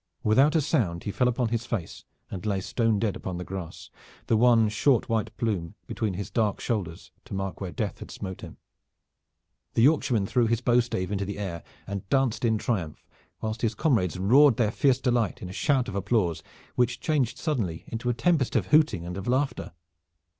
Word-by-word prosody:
Without 135 +8 +4
a 160 - +4
sound 85 -11 0
he 105 - -3
fell 125 +4 +1
upon 125 -1 0
his 115 +1 -2
face 100 -9 -4 0.3
and 95 - -6
lay 100 -3 0
stone 115 +3 0
dead 105 -1 -1
upon 90 -2 -5
the 90 - -4
grass, 90 -3 -7 0.3
the 115 - +2
one 115 -1 +5
short 115 +4 +2
white 110 -2 0
plume 95 -8 -2
between 110 -5 -2
his 100 +1 -5
dark 105 -2 0
shoulders 95 -8 -3
to - - -7
mark 95 0 -4
where 95 -2 -4
Death 105 -4 -3
had - - -9
smote 95 -2 -7
him. - - -10 1.2
The 115 - +4
Yorkshireman 130 -7 +3
threw 120 +3 +2
his 115 0 +1
bowstave 120 -6 +1
into 100 -1 -1
the 100 +1 -5
air 90 -5 -4 0.2
and 100 -1 -6
danced 130 -4 +1
in 110 -2 +2
triumph, 95 -9 -3 0.4
whilst 110 +1 -3
his 115 -1 0
comrades 100 - +1
roared 125 +7 +5
their 110 -3 +2
fierce 130 +1 +2
delight 120 -6 0
in 90 - -7
a - - -8
shout 130 +3 +1
of 100 - -5
applause, 100 -3 0 0.3
which 125 0 +1
changed 145 -7 0
suddenly 110 - -2
into 115 +2 -4
a - - +2
tempest 155 -3 +1
of - - +2
hooting 150 - +3
and 90 +1 -5
of 95 - -6
laughter. 130 +3 -1
110 Hz, 195 wpm, -27 LUFS, 95-125 Hz, 1.2 s, one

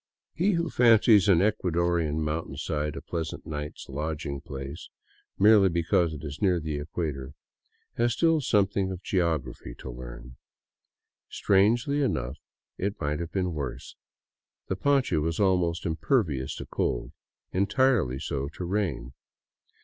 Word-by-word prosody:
He 195 +5 +2
who 170 -1 -1
fancies 110 -4 +5
an 90 -3 +5
Ecuadorian 85 -6 +1
mountainside 75 -1 -3
a - - -7
pleasant 80 -2 -4
night's 75 -1 -6
lodg 75 +3 -4
ing 70 -2 -4
place, 70 +3 -7 0.5
merely 105 -1 +6
because 85 0 +1
it 75 - -9
is 70 -1 -7
near 90 -4 +3
the 75 -2 -3
equator, 75 -3 -4 0.6
has 120 0 +2
still 165 +3 +3
something 100 -5 +1
of 95 -1 -6
geography 80 -10 -1
to 65 - -7
learn. - - -10 0.9
Strangely 115 +9 +2
enough, 70 - -1 0.4
it 100 +2 -2
might 75 +1 -1
have 85 -1 -5
been 90 -3 -1
worse. 70 -5 -5 0.7
The 95 - 0
poncho 135 - +2
was 80 +2 -1
almost 90 -4 +2
impervious 80 - 0
to - - -7
cold, - - -2 0.4
entirely 100 - +2
so 70 +1 -3
to 90 - -4
rain. 85 -10 -2
85 Hz, 135 wpm, -27 LUFS, 75-100 Hz, 0.9 s, merely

